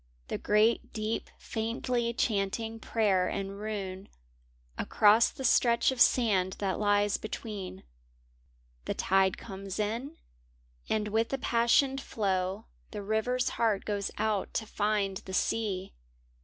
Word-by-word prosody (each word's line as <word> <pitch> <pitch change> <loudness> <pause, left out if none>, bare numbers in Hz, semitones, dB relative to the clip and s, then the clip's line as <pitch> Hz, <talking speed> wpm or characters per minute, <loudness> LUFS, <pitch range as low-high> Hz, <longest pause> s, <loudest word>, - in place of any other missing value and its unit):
The - - -2
great 215 +3 +2
deep 215 +1 -3
faintly 235 +1 -2
chanting 225 0 -1
prayer 200 -5 +1
and 195 +1 -4
rune 200 -2 -5 0.7
Across 215 - +4
the 265 - -8
stretch 235 0 +4
of 255 -2 -2
sand 195 -7 +4
that 195 -2 -2
lies 205 -1 +2
between. 205 - -6 1.0
The - - -2
tide 190 -1 +2
comes 195 0 -7
in, 235 +9 -3 0.7
and 210 -1 0
with 225 +2 +1
the 270 - -1
passioned 265 +3 +2
flow, 195 -2 -1 0.2
The 210 -2 -6
river's 220 +5 0
heart 220 -4 0
goes 205 -2 -2
out 215 -3 -1
to 220 - -1
find 205 -2 0
the 190 0 -6
sea. 195 -4 -1
215 Hz, 125 wpm, -30 LUFS, 195-230 Hz, 1.0 s, Across